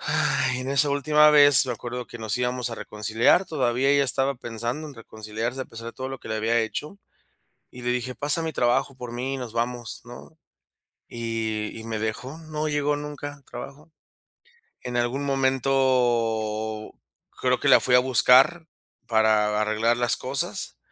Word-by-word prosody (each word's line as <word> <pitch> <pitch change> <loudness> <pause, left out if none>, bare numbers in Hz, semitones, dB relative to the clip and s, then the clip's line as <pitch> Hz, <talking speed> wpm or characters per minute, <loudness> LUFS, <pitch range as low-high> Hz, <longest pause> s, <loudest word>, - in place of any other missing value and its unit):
Ay, 130 0 +1
en 130 +1 -4
esa 140 +1 +3
última 150 +2 +4
vez, 145 -3 +7
me 125 - -1
acuerdo 120 +1 -6
que 120 - -10
nos 110 -1 -2
íbamos 125 0 -1
a - - -4
reconciliar, 110 - +1
todavía 130 -4 0
ella 140 0 +4
estaba 135 +2 0
pensando 120 +6 -5
en 145 - -10
reconciliarse 115 +2 -5
a - - -8
pesar 115 -1 -10
de 115 - -6
todo 130 0 -6
lo 135 0 -6
que - - -11
le 110 - -2
había 115 +2 +1
hecho. 150 - -5 0.7
Y 125 - -11
le 120 - -2
dije: 125 +1 -3
"Pasa 145 +3 0
a - - -4
mi 160 -2 -3
trabajo 120 +2 +1
por 125 -2 -8
mí 125 +3 -3
y - - -5
nos 125 -3 -7
vamos", 120 0 -3
¿no?, 120 +6 -12 0.7
y 110 -2 -3
y - - -9
me 110 -1 -4
dejó, 110 +7 -4
no 155 -1 -4
llegó 150 -1 0
nunca 145 0 -6
al 140 - -23
trabajo. 140 +6 -10 0.9
En 125 0 -4
algún 120 +4 -1
momento, 120 -5 0 0.5
creo - - +1
que - - +1
la - - +8
fui 125 - +3
a - - +8
buscar 130 +6 +4 0.4
para 110 -2 +2
a - - +1
arreglar 110 +2 +1
las 120 -1 +1
cosas, 130 +1 -3
125 Hz, 180 wpm, -25 LUFS, 115-140 Hz, 0.9 s, la